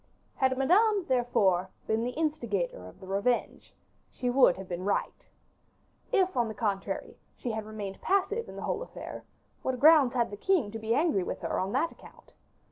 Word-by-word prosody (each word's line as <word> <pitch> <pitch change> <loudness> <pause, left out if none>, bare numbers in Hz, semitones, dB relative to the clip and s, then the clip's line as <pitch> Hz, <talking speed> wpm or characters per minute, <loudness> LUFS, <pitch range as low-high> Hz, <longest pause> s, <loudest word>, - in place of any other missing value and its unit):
Had 260 -1 +2
Madame, 395 +8 +3
therefore, 200 -8 +2 0.2
been 220 +1 0
the 250 +1 -2
instigator 210 - -2
of 90 - -14
the - - -11
revenge, 200 +6 -1 0.4
she 250 -1 -2
would 250 -8 +5
have 190 0 -8
been 175 0 -4
right. 205 - -2 0.8
If, 375 -3 +2
on 240 -2 +2
the 220 - -6
contrary, 195 -2 -3 0.2
she 245 - -4
had 220 -1 -4
remained 205 -3 -6
passive 400 +4 0
in - - -9
the - - -6
whole - - -2
affair, - - -8 0.4
what 255 -1 -2
grounds 290 -3 +6
had 235 -3 +1
the 205 - -6
king 320 - +1
to 225 - -6
be 220 +1 0
angry 305 - +2
with - - -4
her - - -1
on 190 +1 -2
that 320 +6 +1
account? - - -17
240 Hz, 185 wpm, -29 LUFS, 200-300 Hz, 0.8 s, grounds